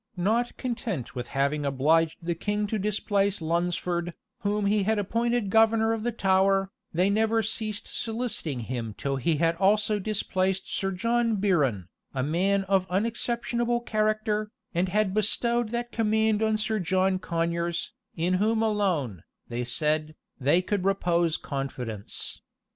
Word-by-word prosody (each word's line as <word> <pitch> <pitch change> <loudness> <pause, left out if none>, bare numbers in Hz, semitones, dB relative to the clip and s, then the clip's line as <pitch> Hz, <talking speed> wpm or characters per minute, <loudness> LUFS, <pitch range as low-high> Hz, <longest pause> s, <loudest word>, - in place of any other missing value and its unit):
Not 225 +7 0
content 230 - -3
with 125 -1 -5
having 140 +2 0
obliged 155 +4 +2
the 170 - +1
king 205 +5 -1
to 215 +1 -2
displace 200 0 0
Lunsford, 175 +1 -1 0.2
whom 205 +1 0
he 205 +1 +3
had 220 +3 +1
appointed 230 +1 0
governor 225 0 +4
of 225 - -2
the 240 +2 -1
Tower,[*] 195 -2 +2 0.2
they 180 +3 +2
never 220 +2 +2
ceased 215 0 -3
soliciting 220 - -3
him 115 -2 -4
till 135 -1 -1
he 155 +5 +1
had 165 +2 +2
also 210 +2 +3
displaced 190 -2 -1
Sir 195 - 0
John 230 +4 +1
Biron, 145 - +1 0.3
a 130 - 0
man 190 +7 +1
of 190 -1 +1
unexceptionable 235 +4 0
character, 215 -1 0 0.2
and 180 +2 +1
had 205 0 +1
bestowed 235 +2 +1
that 240 +1 -3
command 220 -1 +2
on 220 -1 +2
Sir 215 0 0
John 185 +1 +1
Conyers, 170 -1 -1 0.2
in 170 +3 +1
whom 220 +1 +2
alone, 180 - 0 0.3
they 120 +1 -2
said, 155 +4 -1 0.2
they 145 +7 +3
could 200 -1 -1
repose 175 -4 +2
confidence. 125 -7 -5
195 Hz, 140 wpm, -27 LUFS, 165-220 Hz, 0.3 s, governor